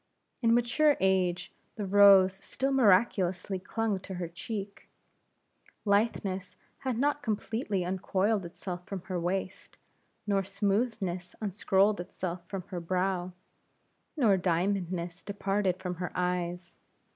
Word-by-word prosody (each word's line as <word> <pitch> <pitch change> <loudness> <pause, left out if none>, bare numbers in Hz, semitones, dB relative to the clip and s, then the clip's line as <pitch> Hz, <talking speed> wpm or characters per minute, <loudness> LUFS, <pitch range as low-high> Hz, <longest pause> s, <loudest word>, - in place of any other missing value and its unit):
In 230 -1 +4
mature 280 +5 +3
age, 185 -2 +1 0.2
the 210 - -3
rose 195 -1 +7
still 270 +2 -2
miraculously 190 -5 +3
clung 215 +1 -1
to 190 0 -8
her 175 -1 -3
cheek; 200 +3 -7 1.0
litheness 200 -3 0 0.2
had 260 -3 -2
not 290 +4 +2
yet - - -28
completely 215 -4 -2
uncoiled 190 +3 0
itself 175 +1 -6
from 195 -2 -5
her 185 0 -4
waist, 185 +2 -3 0.5
nor 200 -2 +1
smoothness 195 -2 -1
unscrolled 200 0 +2
itself 175 0 -5
from 195 -1 -5
her 180 - -4
brow, 180 +1 -1 0.8
nor 220 -9 +4
diamondness 180 -1 -1
departed 200 -2 -1
from 180 -1 -4
her 180 0 -4
eyes. 180 -1 -2
190 Hz, 120 wpm, -30 LUFS, 180-205 Hz, 1.0 s, rose